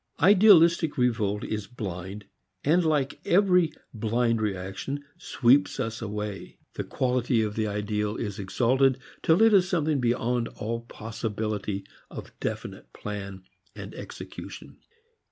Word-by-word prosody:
Idealistic 170 -4 +6
revolt 110 -5 +1
is 105 -2 -4
blind 100 -3 -6 0.4
and 170 +5 +3
like 150 -4 0
every 180 -3 +4 0.2
blind 115 +1 0
reaction 100 +8 -4
sweeps 135 -3 +3
us 115 -3 -3
away. 105 -2 -5 0.2
The - - -3
quality 125 -2 0
of 105 -1 -2
the 110 -1 0
ideal 105 0 -2
is 105 -4 -4
exalted 130 +6 +2 0.2
till 165 +7 +4
it 225 -1 +6
is 185 -2 +5
something 155 -5 +1
beyond 120 -1 0
all 115 +2 -3
possibility 110 -3 -4 0.2
of - - -9
definite - - -5
plan 100 -2 -6 0.3
and - - -8
execution. - - -9
115 Hz, 120 wpm, -27 LUFS, 105-145 Hz, 0.4 s, Idealistic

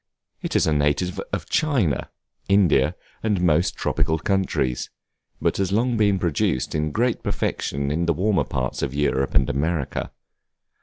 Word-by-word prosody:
It - - -4
is - - +4
a 80 - +2
native 75 +5 +1
of - - -3
China, 130 - +1 0.4
India, 95 -9 +4 0.3
and 105 -4 +1
most 85 -1 +2
tropical 80 - 0
countries; 85 -9 -1 0.5
but - - 0
has 95 -1 0
long 120 +4 +2
been 100 -3 +3
produced 80 -7 0
in 75 0 -1
great 120 +6 0
perfection 70 -8 -2
in 85 +3 0
the 85 - +3
warmer 95 -2 +1
parts 65 -2 -3
of 70 0 -2
Europe 70 -2 0
and 65 -2 +4
America. 75 +1 -2
85 Hz, 150 wpm, -23 LUFS, 70-100 Hz, 0.5 s, is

